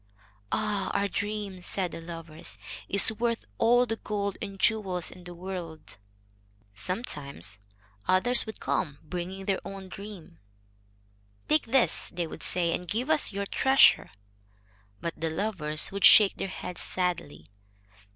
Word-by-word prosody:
"Ah! 210 -3 0
our 200 - +1
dream," 205 -2 -3
said 180 0 0
the - - -7
lovers, 165 -1 -7 0.3
"is 200 +2 +5
worth 230 +1 -1
all 245 +2 +5
the 225 -1 -3
gold 200 -2 -2
and 195 -1 -6
jewels 190 -6 +1
in 180 - -13
the 175 0 -8
world." 170 - -6 0.8
Sometimes 140 - -4 0.5
others 220 +7 +3
would 220 - -7
come, 145 -5 -1
bringing 180 +4 -5
their 195 -1 +1
own 195 -1 -8
dreams. 195 - -10 1.1
"Take 155 +6 +2
this," 255 +1 +2
they 175 -1 -2
would 160 - -9
say, 170 -2 +3
"and 180 - -3
give 245 - -1
us 305 -7 +3
your 200 0 -3
treasure." 265 +6 +5 0.9
But 170 -1 -4
the 165 - +1
lovers 160 -4 0
would 200 0 -4
shake 205 -3 +8
their - - -2
heads 180 -1 -5
sadly. 125 - -2
190 Hz, 140 wpm, -28 LUFS, 170-210 Hz, 1.1 s, shake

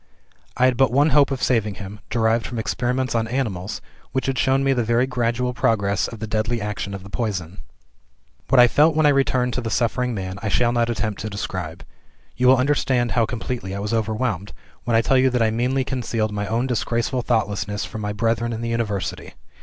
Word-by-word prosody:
I 125 - +4
had 130 -2 +3
but 135 -1 +4
one 145 +4 +3
hope 145 -2 +5
of 135 -2 -3
saving 110 -5 +1
him 100 +2 -8
derived 115 0 +1
from 120 - -6
experiments 125 +3 -1
on 115 -1 0
animals, 110 -6 -3 0.3
which 130 - -1
had 135 -1 -1
shown 135 +1 +2
me 135 0 +3
the 120 -2 0
very 120 +3 +2
gradual 125 0 -1
progress 100 -4 +1
of 115 - -8
the 110 - -4
deadly 110 +2 -1
action 105 -1 -4
of 95 - -8
the 100 - -11
poison. 95 -7 -3 0.9
"What 135 - +5
I 120 - +9
felt 155 +5 +4
when 155 -1 +3
I - - +7
returned 130 -3 +2
to 125 - -1
the 115 - -3
suffering 125 +1 0
man, 95 0 -5
I 110 - -2
shall 120 +3 +2
not 120 -1 +1
attempt 110 -3 -2
to 110 - -4
describe. 90 -4 -5 0.5
You 125 - +2
will 130 +1 +7
understand 130 -2 +1
how 115 -2 +2
completely 115 -5 -4
I - - -4
was 105 +2 -3
overwhelmed, 110 -3 -1 0.3
when 120 - +1
I 115 - +4
tell 130 +2 +3
you 130 0 +4
that 125 -2 +1
I 110 - +2
meanly 125 +4 0
concealed 115 -4 -2
my 105 -1 -3
own 115 +4 0
disgraceful 120 0 -1
thoughtlessness 105 -3 -1
from 110 - -7
my 105 0 -2
brethren 115 +2 0
in 115 - -4
the 115 - -2
University. 100 -6 -3
115 Hz, 215 wpm, -22 LUFS, 105-125 Hz, 0.9 s, I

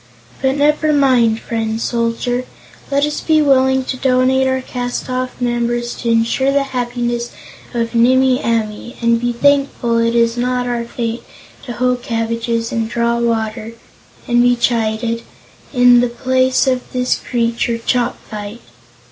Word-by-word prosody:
"But 265 0 +1
never 300 +2 +2
mind, 250 -6 +3
friend 225 -1 -3
Soldier; 235 +2 -1 0.4
let 280 +1 +2
us 300 - -3
be 315 -1 +3
willing 265 -2 +3
to 255 - -3
donate 260 +1 +2
our 260 0 0
cast 245 0 -4
off 255 0 -3
members 240 0 -1
to 235 - -3
insure 230 +4 +2
the 280 0 +2
happiness 240 -1 -2 0.5
of 230 0 -1
Nimmie 255 +2 +3
Amee, 225 0 -2
and 235 0 +2
be 240 0 0
thankful 275 -2 +1
it 230 0 +1
is 230 0 +2
not 250 0 0
our 240 -1 -2
fate 235 0 -4 0.4
to 245 - -5
hoe 250 +1 +1
cabbages 230 -1 -2
and 225 -1 -2
draw 235 0 0
water 225 -1 -2 0.5
and 240 0 +3
be 245 0 +4
chided 230 -1 0 0.5
in 245 -2 +6
the 245 0 +1
place 255 +2 +1
of 255 -2 -1
this 250 0 0
creature 235 -1 -1
Chopfyt." 230 -2 -3
240 Hz, 145 wpm, -17 LUFS, 230-255 Hz, 0.5 s, in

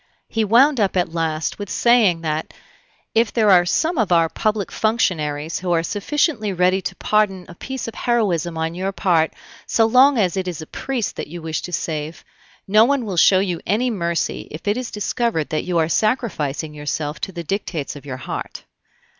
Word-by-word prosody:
He 225 - 0
wound 250 +6 +4
up 195 -2 +1
at 175 -2 0
last 160 0 -2
with 205 -2 -6
saying 220 -7 +3
that 155 -1 -3 0.6
"if 225 0 +2
there 215 -3 +3
are 175 -1 +5
some 320 - +1
of 215 -5 +1
our 165 -1 +4
public 210 0 -1
functionaries 160 -9 0
who 180 -1 -3
are 165 -1 +2
sufficiently 220 - 0
ready 185 +1 +2
to - - -5
pardon 200 -4 +1
a - - -10
piece 265 +8 -6
of 230 - -6
heroism 185 -10 0
on 160 +1 -2
your 190 +3 -2
part 170 -5 +2 0.4
so 225 - +3
long 255 +4 +5
as 185 -6 +1
it 190 -1 -2
is 175 -3 -4
a 155 - -7
priest 250 - -4
that - - -4
you 175 +3 -8
wish 160 -1 -3
to 180 - -7
save, 155 -1 -4 0.4
no 215 +3 +6
one 265 0 +1
will 195 -4 -3
show 185 +3 +6
you 180 -4 -2
any 240 +6 +1
mercy 170 -5 -2
if 155 +6 -9
it 205 - +2
is 250 -1 -4
discovered 210 - -1
that 155 - -2
you 180 -1 -1
are 160 -1 +2
sacrificing 160 - -1
yourself 150 0 -4
to - - -4
the 170 -2 -6
dictates 170 -5 -3
of 145 - -10
your 135 -3 -6
heart." 130 - -6
185 Hz, 195 wpm, -21 LUFS, 165-220 Hz, 0.6 s, no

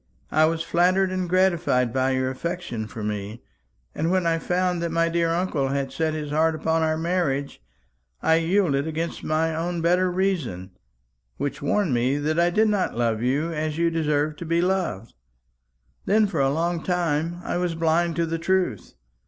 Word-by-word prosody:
I 155 - +4
was 165 0 0
flattered 185 +3 +2
and 185 -1 -2
gratified 170 -10 +2
by 130 0 +1
your 130 0 0
affection 130 -6 -4
for 110 0 -7
me; 105 +2 -4 0.5
and 160 +2 -1
when 185 -1 +1
I 165 0 +1
found 180 0 0
that 170 -1 -2
my 165 0 +2
dear 170 0 +1
uncle 165 -5 0
had 135 0 -2
set 155 +3 -1
his 150 -2 -5
heart 160 +1 +2
upon 160 +1 0
our 155 0 +1
marriage, 160 - -1 0.6
I 160 - +3
yielded 165 -4 +1
against 160 +1 -4
my 160 +1 0
own 170 +2 -2
better 180 +2 +2
reason, 170 - -2 0.7
which 145 +2 -3
warned 170 +1 +1
me 125 +4 +1
that 155 +3 0
I 170 0 +4
did 215 +5 +3
not 200 - 0
love 115 -2 0
you 145 +7 0
as 155 0 -2
you 170 0 +2
deserved 150 -2 0
to 170 - -6
be 165 +1 +1
loved. 175 - -1 0.9
Then 215 +2 +4
for 190 -7 -2
a 135 - +3
long 165 +3 -1
time 170 -1 -1
I - - -2
was 175 -2 -1
blind 165 +1 +1
to 170 0 +1
the 165 0 -3
truth. 185 +2 -1
165 Hz, 180 wpm, -24 LUFS, 145-175 Hz, 0.9 s, I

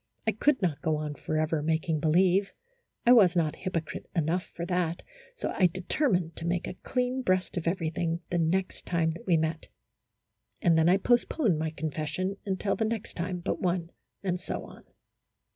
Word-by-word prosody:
I 220 - +3
could 260 +2 +2
not 165 -6 0
go 160 -2 +1
on 150 -1 -3
forever 155 +1 -1
making 160 0 0
believe, 185 +5 +3 0.5
I 240 - +7
was 195 -7 +6
not 160 -3 +1
hypocrite 175 -4 -4
enough 170 +2 +1
for 170 - -3
that, 175 -2 -1 0.3
so - - -3
I 185 - +5
determined 180 - 0
to 165 - -3
make 175 0 0
a - - -5
clean 250 +6 -1
breast 185 -5 +1
of 170 -2 -2
everything 170 -1 -1
the 175 - +1
next 185 +3 -1
time 165 -2 +1
that 165 +3 -10
we 170 -3 +5
met. 160 0 -2 0.9
And 170 -2 +4
then 160 +1 +4
I 185 - +5
postponed 240 - +2
my 160 0 0
confession 155 +5 -3
until 195 +1 0
the 225 - 0
next 220 -1 -3
time 180 +1 -3
but 180 - -2
one, 175 -1 0 0.3
and 180 -2 -1
so - - -4
on. - - -13
175 Hz, 175 wpm, -29 LUFS, 160-190 Hz, 0.9 s, I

